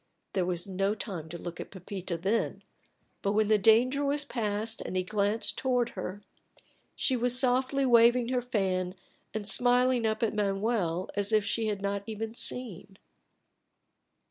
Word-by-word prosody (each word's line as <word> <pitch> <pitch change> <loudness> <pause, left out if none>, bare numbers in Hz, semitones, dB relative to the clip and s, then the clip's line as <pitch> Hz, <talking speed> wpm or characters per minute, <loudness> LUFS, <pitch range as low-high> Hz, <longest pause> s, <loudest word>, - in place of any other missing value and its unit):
There 185 -2 0
was 175 -1 -2
no 195 +1 -1
time 180 -7 -6
to 170 - -6
look 170 0 -7
at - - -6
Pepita 185 -2 -6
then, 195 +7 -1 0.6
but 200 - 0
when 215 0 +2
the 215 -1 +5
danger 245 +7 +4
was 285 +1 0
passed 220 -3 -2
and 185 - -4
he 185 - +1
glanced 205 +3 0
toward 250 -2 +1
her, 190 +1 -6 0.7
she 265 - +1
was 245 +1 +2
softly 260 +1 +2
waving 240 0 +5
her 250 -1 +1
fan 190 -6 -1 0.4
and 210 -2 -4
smiling 245 +1 +3
up 220 +1 -1
at 220 - +1
Manuel 195 -3 0
as 205 +1 -1
if 215 -2 +3
she 225 -1 0
had 205 -2 -2
not 200 0 -1
even 220 0 -4
seen. 210 -6 -5
215 Hz, 160 wpm, -29 LUFS, 195-245 Hz, 0.7 s, the